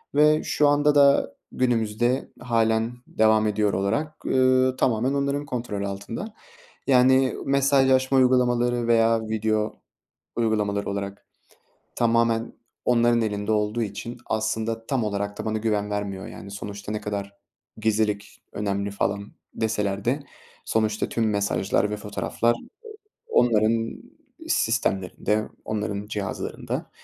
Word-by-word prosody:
ve 150 +1 +5
şu 150 - +2
anda 145 0 +3
da 140 -9 +4 0.2
günümüzde 120 +1 0
hâlen 115 -1 +1 0.2
devam 110 0 +3
ediyor 105 -1 +1
olarak, 145 +11 -1
eee, 130 0 +3
tamamen 125 +2 +1
onların 140 +1 -1
kontrolü 115 -6 -3
altında. 115 - -6 0.5
Yani 130 0 +4
mesajlaşma 135 -1 +3
uygulamaları 120 -2 +3
veya 115 -1 +4
video 110 0 -1 0.5
uygulamaları 105 -3 0
olarak 100 0 -5 0.7
tamamen 115 -1 +2 0.3
onların 120 -1 +3
elinde 105 0 -1
olduğu 105 +2 0
için 115 +4 -5
aslında 110 +1 -2
tam 130 -5 0
olarak 100 0 -3
da - - -4
bana 110 0 -1
güven 105 -2 -1
vermiyor 100 -2 -3
yani. 100 - -10
Sonuçta 100 +1 -6
ne 105 - -2
kadar 100 -1 -4 0.5
gizlilik 105 -1 -1
önemli 100 -1 -2
falan 100 0 -2 0.2
deseler 105 -3 -1
de 135 +4 +1 0.5
sonuçta 110 -1 0
tüm 115 -2 0
mesajlar 100 0 0
ve 105 - -2
fotoğraflar 110 +3 -1 0.7
o - - +4
onların 115 - +1 0.5
sistemlerinde, 110 - 0 0.2
onların 105 -1 -3
cihazlarında. 100 -2 -4
110 Hz, 115 wpm, -25 LUFS, 105-125 Hz, 0.7 s, ve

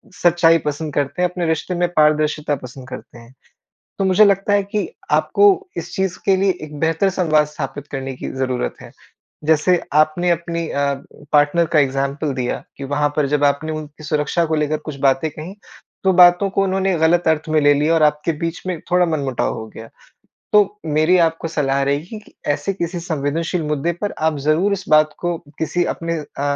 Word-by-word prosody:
सच्चाई 170 -1 +4
पसंद 150 0 -3
करते 145 +5 -1
हैं, 180 - +2
अपने 180 -1 -3
रिश्ते 160 +3 -1
में 175 0 +1
पारदर्शिता 150 -1 +2
पसंद 130 0 -11
करते 120 - -10
हैं। 115 +2 -15 0.7
तो 195 - 0
मुझे 190 +3 +5
लगता 200 0 +2
है 205 0 +3
कि 205 +2 -3 0.2
आपको 410 - +3 0.3
इस - - -6
चीज़ 190 -3 -1
के 195 -1 +3
लिए 195 +1 +2
एक 150 -1 -10
बेहतर 165 +4 +1
संवाद 155 -5 +2
स्थापित 145 -1 -6
करने 135 -1 -4
की - - -6
ज़रूरत 130 -1 -2
है। - - -12 0.5
जैसे 160 +3 +3
आपने 155 +3 +3
अपनी 170 0 -2
अ, 140 0 0 0.4
पार्टनर 150 +3 +3
का - - +6
एग्ज़ाम्पल 140 +2 -1
दिया 125 -1 -3
कि 140 - -7
वहाँ 145 +2 0
पर 150 -2 +2
जब 145 0 +1
आपने 145 +2 +1
उनकी 155 0 -8
सुरक्षा 150 +2 0
को 160 - -1
लेकर 150 0 0
कुछ 145 - -5
बातें 135 +3 +2
कहीं 160 +6 -9 0.5
तो 190 - +4
बातों 180 +2 +6
को 195 - +1
उन्होंने 190 0 0
ग़लत 170 +2 +2
अर्थ 160 0 0
में 155 -1 +3
ले 145 0 +5
लिया 150 +3 +2
और 160 - +2
आपके 150 +2 +2
बीच 165 0 -3
में 180 -4 -3
थोड़ा 180 0 +4
मन 155 -3 -1
मुटाव 135 -3 -1
हो 110 - -7
गया। 115 0 -10 0.6
तो 210 0 +3
मेरी 155 +4 +3
आपको 165 0 +1
सलाह 140 -3 0
रहेगी 150 +10 -2
कि - - -21 0.2
ऐसे 145 +7 -2
किसी 175 -1 -3
संवेदनशील 160 +2 -2
मुद्दे 150 +3 -1
पर 205 - -1
आप 160 -2 +1
ज़रूर 175 +7 +2
इस 190 -1 -3
बात 155 0 +4
को 175 -1 -2 0.2
किसी 175 +2 0
अपने 165 0 -3
अ, 145 -1 -8
155 Hz, 195 wpm, -19 LUFS, 145-175 Hz, 0.7 s, का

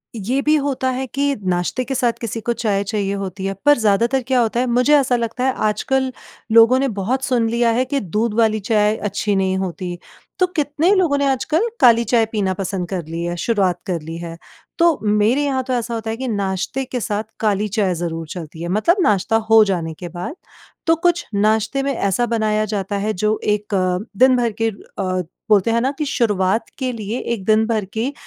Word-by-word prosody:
ये 240 +6 -1
भी 305 +2 +3
होता 275 -3 0
है 260 +1 -3
कि 280 +2 0 0.2
नाश्ते 175 +8 -1
के 270 - -3
साथ 245 -2 +1
किसी 230 0 -3
को 235 - +2
चाय 205 -4 0
चाहिए 200 -1 -2
होती 195 -1 -5
है 195 - -1
पर 290 0 +6
ज़्यादातर 230 +5 +2
क्या 260 -1 +2
होता 235 +1 0
है 255 - +2
मुझे 250 +5 +4
ऐसा 260 -3 +2
लगता 235 +1 -2
है 265 - +2
आजकल 260 +5 0 0.4
लोगों 230 +3 +6
ने 275 - +1
बहुत 250 +7 -1
सुन 240 -4 +1
लिया 235 0 +2
है 250 +3 +1
कि 280 +1 -1
दूध 210 +3 -1
वाली 220 -1 +3
चाय 210 +1 +2
अच्छी 205 0 -2
नहीं 190 -1 +1
होती। 180 -1 -4 0.4
तो 365 - +4
कितने 310 +2 +1
लोगों 340 -7 +2
ने 280 - +1
आजकल 310 - 0
काली 235 -1 +6
चाय 235 -1 +2
पीना 200 -4 0
पसंद 190 -2 -3
कर 180 -4 -3
लिया, 170 +2 -4
शुरुआत 185 -2 0
कर 175 -3 -2
ली 165 +2 -7
है। 170 -1 -7 0.4
तो 335 -2 +4
मेरे 210 +6 +2
यहाँ 265 -2 0
तो 255 0 -3
ऐसा 235 -1 -2
होता 225 -1 -4
है 225 - -3
कि 260 +1 -4
नाश्ते 200 +4 -2
के 250 0 -4
साथ 215 -2 -2 0.2
काली 210 -1 +1
चाय 200 -3 0
ज़रूर 165 -1 -4
चलती 160 -1 -8
है 170 - -3
मतलब 215 - +2
नाश्ता 205 - +2
हो 220 0 +8
जाने 170 -5 -2
के 180 - -6
बाद। 180 - -6 0.5
तो 330 - +5
कुछ 345 +1 +1
नाश्ते 220 +6 +1
में 275 0 0
ऐसा 200 +1 0
बनाया 215 -2 0
जाता 205 -1 -3
है 210 +2 -1
जो 215 +3 0
एक 210 0 -1
अ, 185 -1 +1 0.2
दिन-भर 250 -3 +4
के 225 - +3
अ, 185 -3 -4 0.3
बोलते 210 +1 +4
हैं 230 - +2
ना 265 +3 +1
कि 305 - -1
शुरुआत 210 -6 +1
के 260 -2 -1
लिए 220 +1 -4 0.2
एक 205 -5 -5
दिन-भर 220 0 +2
की 235 +6 -2
220 Hz, 210 wpm, -20 LUFS, 195-255 Hz, 0.5 s, हो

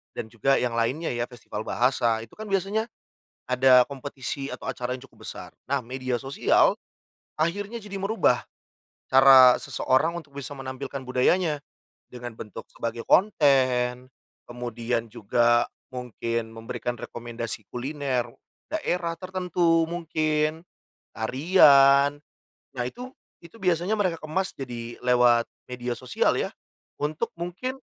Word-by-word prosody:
dan - - -4
juga 135 +4 +1
yang 120 -2 -1
lainnya 130 +8 0
ya, 120 0 -1
festival 110 -3 -7
bahasa. 120 -3 +1
Itu - - -16
kan 220 - -5
biasanya 200 +3 0 0.6
ada 125 0 +6
kompetisi 135 0 -5
atau - - -7
acara 125 0 -4
yang 130 - -9
cukup - - -18
besar, - - -8 0.2
nah - - 0
media 130 +1 -4
sosial 135 +3 +2 0.6
akhirnya 200 +8 -2
jadi 200 -1 -6
merubah 195 - +1 0.6
cara 130 -1 +8
seseorang 155 +6 +1
untuk 160 -5 -8
bisa 140 +1 -6
menampilkan 135 0 -6
budayanya 150 +5 +2 0.5
dengan 120 -1 -8
bentuk 105 -2 -9
sebagai 115 0 -4
konten, 130 -9 +3 0.4
kemudian 120 -1 -3
juga 120 +3 +2 0.2
mungkin 115 -2 -3
memberikan 115 +2 -5
rekomendasi 115 -2 -6
kuliner 130 -1 -2 0.4
daerah 180 - -1
tertentu 180 -3 +1
mungkin, 155 -2 -1 0.5
tarian. 140 +1 +5 0.6
Nah, 125 - 0
itu 250 - -8 0.3
itu 170 +7 -14
biasanya 180 +2 +1
mereka 185 -5 0
kemas 185 +5 -2
jadi 120 -3 -7
lewat 125 -1 +4 0.2
media 125 -1 -4
sosial 130 - +1
ya, - - -1 0.5
untuk 150 +1 -2
mungkin 180 +10 -4
135 Hz, 120 wpm, -26 LUFS, 120-165 Hz, 0.6 s, cara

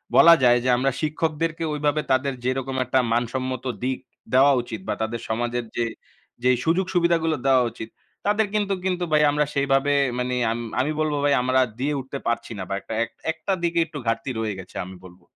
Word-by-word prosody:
বলা 170 - +9
যায় 120 -1 +6
যে, 130 - -1
আমরা 135 +2 +1
শিক্ষকদেরকে 160 +1 -1
ঐভাবে 150 0 0
তাদের 135 +1 +2
যেরকম 130 +1 -1
একটা 130 +2 +2
মানসম্মত 130 +2 -2 0.2
দিক 130 0 0 0.4
দেওয়া 135 +2 +6
উচিত 120 -3 -7
বা - - 0
তাদের 110 +1 -2
সমাজের 120 +1 -1
যে, 120 - 0 0.6
যে, - - +3 0.2
সুযোগ-সুবিধাগুলো 170 -2 +2
দেওয়া 130 -2 +5
উচিত 110 - -8 0.4
তাদের 210 +1 +2
কিন্তু 205 -2 +1
কিন্তু 180 -1 0
ভাই 150 0 +4
আমরা 150 0 +1
সেভাবে 140 0 +2 0.3
মানে 125 0 -1 0.5
আমি 145 - 0
বলবো 155 -2 0
ভাই 145 - +4
আমরা 130 +1 +2 0.2
দিয়ে 145 +3 0
উঠতে 135 +2 -6
পারছি 115 0 -1
না। 95 - -4
বা - - -2
একটা - - -7 0.4
একটা 160 +4 -3
দিকে 170 0 +1
একটু 155 -2 -9
ঘাটতি 115 +3 -1
রয়ে 110 -3 -2
গেছে 90 - -17
আমি 95 +1 -10
বলবো। 90 -1 -15
135 Hz, 180 wpm, -24 LUFS, 120-155 Hz, 0.6 s, বলা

